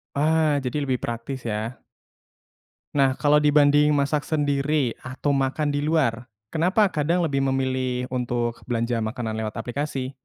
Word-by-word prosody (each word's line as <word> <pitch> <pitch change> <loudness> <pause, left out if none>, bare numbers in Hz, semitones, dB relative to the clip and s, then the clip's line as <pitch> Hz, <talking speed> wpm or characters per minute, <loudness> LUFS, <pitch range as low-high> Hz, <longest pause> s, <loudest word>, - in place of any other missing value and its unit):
Ah, 155 0 +2
jadi 140 +3 -2
lebih 130 -2 -1
praktis, 120 +2 -5
ya? 110 +3 -4 1.1
Nah, 135 -2 +3
kalau 150 0 +4
dibanding 150 0 +4
masak 145 +1 0
sendiri 145 -3 +1
atau 130 +3 -3
makan 140 +2 0
di 145 - -1
luar, 145 -6 0 0.2
kenapa 185 +5 +2
kadang 165 +4 +1
lebih 140 -4 0
memilih 130 -2 0
untuk 120 -2 -2
belanja 115 -1 -1
makanan 110 0 -3
lewat 110 -1 -4
aplikasi? 130 +3 -3
135 Hz, 135 wpm, -24 LUFS, 125-150 Hz, 1.1 s, kalau